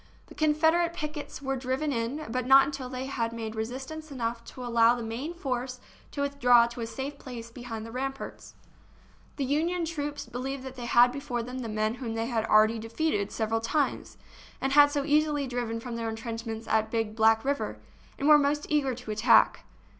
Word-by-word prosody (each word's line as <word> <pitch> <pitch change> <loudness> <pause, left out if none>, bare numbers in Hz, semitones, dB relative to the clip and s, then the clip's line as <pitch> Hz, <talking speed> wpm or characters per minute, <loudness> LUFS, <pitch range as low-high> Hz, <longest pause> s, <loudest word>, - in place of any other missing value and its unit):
The - - -11
Confederate 320 +3 +2
pickets 300 -3 -6
were 270 0 -1
driven 265 +3 -1
in, 245 +6 -2
but 255 0 -2
not 270 +1 +8
until 275 -3 -5
they 255 0 -4
had 235 -4 -2
made 225 -1 -5
resistance 265 +8 -5
enough 235 -3 -3
to 255 - -8
allow 235 0 +4
the 240 - -5
main 235 +8 -4
force 255 -4 -3 0.3
to 285 - -4
withdraw 245 -4 +5
to 235 0 -7
a 225 - -3
safe 270 +5 -6
place 235 -3 -8
behind 230 -3 -7
the 225 - -9
ramparts. 270 +2 -5 0.8
The 275 - -2
Union 330 +6 0
troops 295 -3 -4
believed 260 +2 -5
they 260 -2 -7
had 240 +1 +6
before 255 -3 -3
them 250 +2 -6
the 235 -3 -4
men 215 +1 0
whom 225 -3 -3
they 225 0 -1
had 230 -2 -1
already 215 +1 +5
defeated 225 -2 -1
several 225 0 -1
times 290 +6 -1 0.4
and 270 0 -1
had 290 0 +8
so 290 -1 -1
easily 300 -1 +2
driven 240 -3 -3
from 235 0 -6
their 230 -1 -2
intrench 225 +1 -5
ments 225 0 -5
at 220 0 +1
Big 225 -1 -2
Black 225 +1 +4
River, 280 +1 -1 0.4
and 280 - -1
were 300 -1 +8
most 290 +1 +1
eager 275 -4 +1
to 240 -3 -7
attack. 215 +3 +4
250 Hz, 190 wpm, -28 LUFS, 230-285 Hz, 0.8 s, not